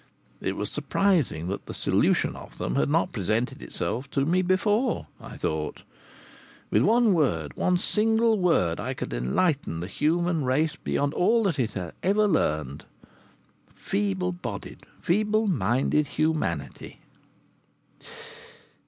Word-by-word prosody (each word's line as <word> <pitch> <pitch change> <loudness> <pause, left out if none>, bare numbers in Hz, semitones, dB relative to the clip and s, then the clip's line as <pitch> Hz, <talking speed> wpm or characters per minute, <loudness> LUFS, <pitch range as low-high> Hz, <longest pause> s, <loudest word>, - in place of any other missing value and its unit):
It - - -2
was - - -3
surprising 160 - +1
that 100 - -5
the - - -7
solution - - +1
of - - -12
them - - -2
had 140 - +1
not 165 +4 +1
presented 110 - -1
itself 120 - -4
to 140 0 0
me 180 +4 +2
before! 205 +6 +1
I - - -10
thought: 80 -1 -3 0.9
With - - +4
one 230 -1 +4
word, 80 - 0
one 180 0 +2
single 220 +3 +2
word, 90 - +2
I 130 +5 -3
could - - -5
enlighten 80 - 0
the 85 - -4
human 165 - 0
race 140 +5 +1
beyond 145 +1 -1
all 230 +6 +3
that 170 -8 0
it 115 -3 0
has 90 -4 -5
ever 210 +3 +3
learned. 75 - 0 0.9
Feeble 95 -3 -1
bodied, 90 - -7
feeble 215 +4 +1
minded 135 - +1
humanity! 155 - -2
150 Hz, 130 wpm, -26 LUFS, -, 0.9 s, With